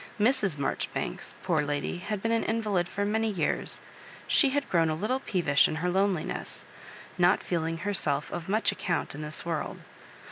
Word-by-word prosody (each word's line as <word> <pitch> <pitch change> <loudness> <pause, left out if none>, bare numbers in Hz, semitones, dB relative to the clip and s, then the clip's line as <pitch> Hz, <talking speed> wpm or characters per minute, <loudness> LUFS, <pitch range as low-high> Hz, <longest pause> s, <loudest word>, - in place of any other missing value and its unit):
Mrs. 210 - +2
Maijori 140 - -1
banks^ - - -4
poor 170 -5 +2
lady, 145 +3 -2
had 205 +1 -4
been 225 - +1
an 230 0 +2
invalid 210 -6 0
for 200 +1 -1
many 220 +2 +1
years; 180 -7 -1 0.5
she 280 - +5
had 285 +1 0
grown 165 -2 +3
a 155 - -1
Utile 220 +9 0
peevish 160 -7 +3
in - - -3
her 180 +3 0
loneliness, 190 -3 -1 0.5
not 180 +2 +4
feeling 165 -1 -1
herself 160 -7 -1
of 175 +1 -5
much 215 +3 +3
account 170 -4 -2
in 145 - -7
this 150 +2 -4
world. 165 -2 -2
180 Hz, 175 wpm, -29 LUFS, 160-210 Hz, 0.5 s, she